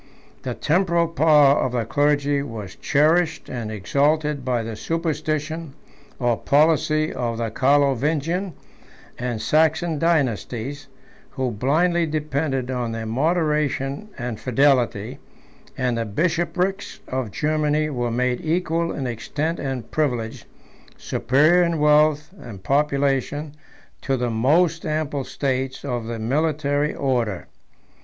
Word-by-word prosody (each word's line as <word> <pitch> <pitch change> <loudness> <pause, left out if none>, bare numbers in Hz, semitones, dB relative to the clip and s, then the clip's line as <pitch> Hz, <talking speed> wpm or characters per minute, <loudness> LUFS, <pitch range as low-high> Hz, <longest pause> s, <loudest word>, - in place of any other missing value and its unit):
The - - -4
temporal 170 0 +1
power 150 -3 +5
of 125 - -1
the 120 -2 0
clergy 145 +1 +1
was 110 -8 -7
cherished 160 +3 +1
and 115 -4 -4
exalted 145 +7 0
by 125 -2 0
the 110 0 -5
superstition 155 +2 -3 0.4
or 120 -3 0
policy 155 +1 +2
of 120 -2 -2
the 115 -1 -2
Carlovingian 145 - +1 0.7
and 120 -2 -2
Saxon 160 +3 +2
dynasties, 135 - -1 0.4
who 130 -2 -2
blindly 165 - +1
depended 145 -4 -2
on 120 -3 -2
their 115 0 -4
moderation 150 - 0
and 120 -3 -4
fidelity; 125 -5 +1 0.6
and 125 -2 0
the 115 - -1
bishoprics 175 - -1
of 130 -3 -3
Germany 155 +4 0
were 120 -3 -1
made 125 +1 0
equal 165 0 0
in 135 - -4
extent 145 +8 -3
and 130 -4 -4
privilege, 120 -7 -2 0.5
superior 155 +8 +3
in 170 -1 +1
wealth 150 0 +3
and 100 -6 -10
population, 140 +1 0 0.5
to 135 -1 0
the 120 -1 -1
most 155 +9 +2
ample 155 -3 -2
states 135 0 -3
of 120 -4 -3
the 115 0 -4
military 145 +4 0
order. 120 -8 -1
145 Hz, 120 wpm, -22 LUFS, 125-155 Hz, 0.7 s, power